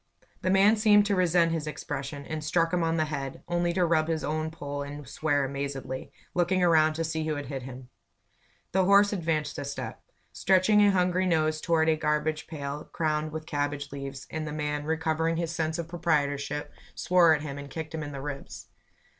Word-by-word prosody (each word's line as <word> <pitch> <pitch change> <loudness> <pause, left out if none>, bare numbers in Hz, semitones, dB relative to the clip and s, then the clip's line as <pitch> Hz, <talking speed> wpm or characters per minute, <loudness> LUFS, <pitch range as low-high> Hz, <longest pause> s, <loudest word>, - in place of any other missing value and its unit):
The 185 - 0
man 195 +3 +5
seemed 210 -1 +5
to 205 -1 +1
resent 175 -2 +3
his 160 -2 -2
expression, 140 -1 -5
and 155 -1 -4
struck 165 +2 +1
him 180 - +2
on 165 0 +1
the 155 - +2
head, 135 -3 -5
only 175 0 +1
to 180 0 +2
rub 160 -2 +2
his 160 -1 -1
own 155 +1 -1
poll 145 -3 -5
and 145 -1 -7
swear 145 0 0
amazedly, 135 -1 -5 0.2
looking 180 +1 +2
around 155 -2 +5
to 165 +1 -2
see 160 0 -2
who 155 - 0
had 145 0 -4
hit 135 -2 -4
him. 125 0 -9 0.8
the 190 +1 +3
horse 200 +2 +5
advanced 165 -5 -1
a - - -3
step, 140 0 -6 0.3
stretching 195 +3 +4
a 205 - +6
hungry 185 -1 +2
nose 155 -2 +1
toward 160 -1 +2
a 160 - +4
garbage 155 0 -1
pail 145 -1 -5
crowned 155 -1 -1
with 155 0 -6
cabbage 145 -1 -2
leaves, 140 -1 -6
and 155 -1 -3
the - - -4
man, 150 -1 -2
recovering 160 +1 0
his 170 -1 -2
sense 160 -1 -1
of 170 -2 -4
proprietorship, 145 -4 -1 0.2
swore 175 -3 +5
at 150 - -5
him 140 -2 -5
and 140 0 -8
kicked 160 +2 -6
him 160 - -3
in 145 -1 -5
the 135 -1 -6
ribs. 140 -1 -7
155 Hz, 200 wpm, -28 LUFS, 145-170 Hz, 0.8 s, a